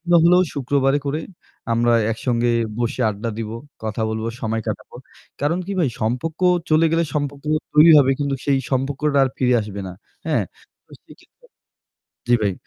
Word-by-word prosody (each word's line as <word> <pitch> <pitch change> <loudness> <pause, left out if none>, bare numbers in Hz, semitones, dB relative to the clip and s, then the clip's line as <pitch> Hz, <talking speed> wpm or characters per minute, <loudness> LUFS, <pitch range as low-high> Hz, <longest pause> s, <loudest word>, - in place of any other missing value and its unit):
গুলা 175 0 +4
হলেও 180 +2 +5
শুক্রবারে 140 +1 +1
করে 150 +3 -1 0.5
আমরা 120 +1 +2 0.2
একসঙ্গে 120 +1 0 0.3
বসে 120 +1 -2
আড্ডা 110 +3 -4
দিব, 110 -1 -4 0.3
কথা 110 +1 -3
বলবো, 110 +1 -3
সময় 110 0 -2
কাটাবো। 110 +3 -6 0.4
কারণ 155 +5 0
কি 200 - -4
ভাই? 155 -7 +2
সম্পর্ক 125 +10 -2 0.3
চলে 155 +1 +4
গেলে 165 0 +2
সম্পর্ক 145 -1 -3 0.3
তৈরি 155 +2 +8
হবে 135 -1 +4
কিন্তু 140 -1 -1
সেই 140 -2 +2
সম্পর্কটা 140 +2 0
আর - - 0
ফিরে 125 -1 +2
আসবে 100 -1 -6
না। - - -7 0.3
হ্যাঁ? - - +1 0.4
তো - - -36
সেইক্ষেত্রে - - -20 0.8
জি, 120 - +5
ভাই। 100 -2 +1
135 Hz, 160 wpm, -21 LUFS, 115-150 Hz, 0.8 s, তৈরি